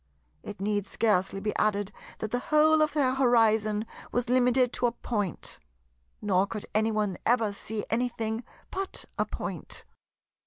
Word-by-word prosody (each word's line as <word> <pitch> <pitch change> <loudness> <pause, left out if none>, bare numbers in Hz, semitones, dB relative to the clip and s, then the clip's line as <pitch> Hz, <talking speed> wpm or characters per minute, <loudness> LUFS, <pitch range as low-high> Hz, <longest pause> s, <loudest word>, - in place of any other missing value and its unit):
It 205 - -8
need 205 0 0
scarcely 195 -3 +1
be 210 +1 -2
added 205 -1 +1 0.3
that 220 - -4
the 245 - +1
whole 310 +3 +4
of 305 -1 +2
their 270 -4 +2
horizon 220 -4 +3 0.3
was 245 -1 -1
limited 250 0 +3
to 245 - +2
a - - 0
Point; 205 -7 -3 0.6
nor 195 -1 +3
could 210 -1 -5
any 220 +1 +3
one 210 -4 -1
ever 225 -3 +2
see 210 +1 -5
anything 225 -1 -1 0.3
but 385 0 -3
a - - +2
Point. - - -5
220 Hz, 150 wpm, -28 LUFS, 210-245 Hz, 0.6 s, whole